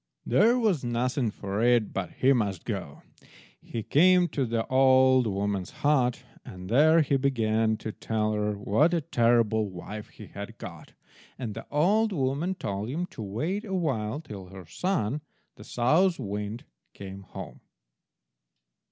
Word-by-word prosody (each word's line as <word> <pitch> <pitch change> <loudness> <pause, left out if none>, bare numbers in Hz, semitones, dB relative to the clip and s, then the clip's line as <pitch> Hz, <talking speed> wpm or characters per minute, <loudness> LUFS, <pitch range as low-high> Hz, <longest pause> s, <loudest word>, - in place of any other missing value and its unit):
There 220 - +4
was 210 - +1
nothing 120 +1 0
for 100 0 -4
it 120 -2 +3
but 95 -2 -3
he 135 +2 +3
must 100 -8 -1
go. 95 -10 -5 0.6
He 115 -2 -5
came 180 - +4
to 135 -4 -1
the 115 0 -1
old 130 -1 +4
woman's 100 -2 -2 0.2
hut, 130 -4 +2 0.2
and 90 0 -9
there 155 +7 +5
he 140 -1 +1
began 110 -5 +1
to 110 - -5
tell 110 0 -2
her 105 -1 -1
what 125 - +2
a 165 - 0
terrible 115 -5 +2
wife 105 +4 -8
he - - -13
had - - -9
got, - - -10 0.4
and 120 -5 -4
the - - -9
old 205 +9 +2
woman 145 +5 -1
told 100 - -4
him 165 +7 -2
to 115 - -8
wait 155 - -3
a 195 -4 -4
while 135 -8 -1
till 100 - -9
her 95 -1 -11
son, 150 - -1 0.3
the - - -13
South 165 +9 +2
wind, 105 0 -5 0.3
came 95 0 -8
home. 95 - -9
120 Hz, 150 wpm, -27 LUFS, 105-150 Hz, 0.6 s, there